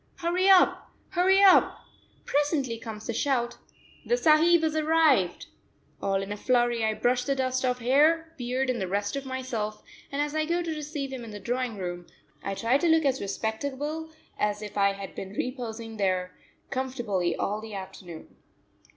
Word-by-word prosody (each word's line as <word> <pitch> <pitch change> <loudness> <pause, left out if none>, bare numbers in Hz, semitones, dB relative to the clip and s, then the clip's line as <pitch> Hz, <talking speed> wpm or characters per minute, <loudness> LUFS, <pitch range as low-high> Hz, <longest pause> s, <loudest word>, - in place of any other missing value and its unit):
Hurry 360 +3 +1
up! 380 -2 +5 0.2
Hurry 380 +2 +4
up! 385 -2 +6 0.5
Presently 285 -5 0
comes 220 -1 -8
the 235 - -2
shout: 240 -1 0 0.5
"The 485 - +1
sahib 330 -3 +5
has 315 -1 0
arrived." 310 - +3 0.6
All 195 0 0
in 195 - -7
a 205 - -3
flurry 240 0 +1
I 220 0 +1
brush 250 +2 +1
the 275 +1 0
dust 260 -1 -1
off 250 -1 +1
hair, 305 +7 +3
beard, 255 +1 -1
and 240 -4 -3
the 190 - -1
rest 205 +4 -1
of 275 -1 -4
myself, 240 -5 -4 0.3
and 280 - -3
as 295 0 -1
I 310 0 0
go 340 +2 0
to 330 -1 -3
receive 295 -2 -5
him 255 -2 -6
in 230 - -8
the 210 -1 -8
drawing 245 0 -2
room, 175 -2 -5 0.3
I 195 - -3
try 235 +7 +2
to 345 - +1
look 320 -1 +4
as 270 -1 +1
respectable 280 +10 -3 0.3
as 210 0 0
if 210 - -8
I 200 -1 +3
had 195 -1 -8
been 190 0 -7
reposing 230 -2 -5
there 185 -2 -1 0.4
comfortably 240 -10 -1
all 210 +2 -2
the 220 -2 -8
afternoon. 190 -4 -9
250 Hz, 175 wpm, -27 LUFS, 210-300 Hz, 0.6 s, up